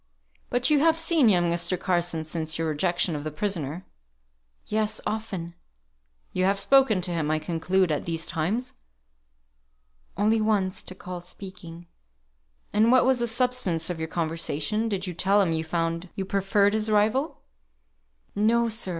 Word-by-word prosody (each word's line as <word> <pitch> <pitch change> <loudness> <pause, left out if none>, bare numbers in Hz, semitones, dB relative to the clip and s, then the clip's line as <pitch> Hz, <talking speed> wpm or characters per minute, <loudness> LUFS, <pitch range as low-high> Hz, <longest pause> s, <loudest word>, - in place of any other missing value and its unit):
"But 245 +4 +1
you 295 - +5
have 325 +2 +3
seen 325 -6 +3
young 175 -3 +3
Mr. 170 +1 +1
Carson 175 -3 0
since 160 0 -3
your 165 0 -1
rejection 175 +2 0
of 145 - -5
the 155 - -3
prisoner?" 165 -1 -3 0.8
"Yes, 215 0 -1
often." 195 -6 -4 0.8
"You 185 - 0
have 195 +1 +2
spoken 220 -2 +4
to 180 - -1
him, 160 -3 -1
I 155 - +2
conclude, 170 +3 0
at 150 - -2
these 165 -1 -3
times." 210 +11 -2 1.4
"Only 215 +2 +2
once 195 -3 0
to 185 - -8
call 180 -1 -7
speaking." 175 -2 -10 0.9
"And 220 +3 +4
what 255 -1 +5
was 260 -1 +3
the 240 - +1
substance 225 -9 +1
of 170 - -5
your 160 - -3
conversation? 165 +6 -1
Did 195 -2 -2
you 180 - -4
tell 195 +4 +3
him 180 -5 +2
you 160 0 -1
found 165 +2 -2
you 195 - -3
preferred 200 +1 +2
his 220 0 0
rival?" 215 +8 +1 0.9
"No, 230 +3 +2
sir. 220 -3 -2
185 Hz, 160 wpm, -26 LUFS, 165-220 Hz, 1.4 s, you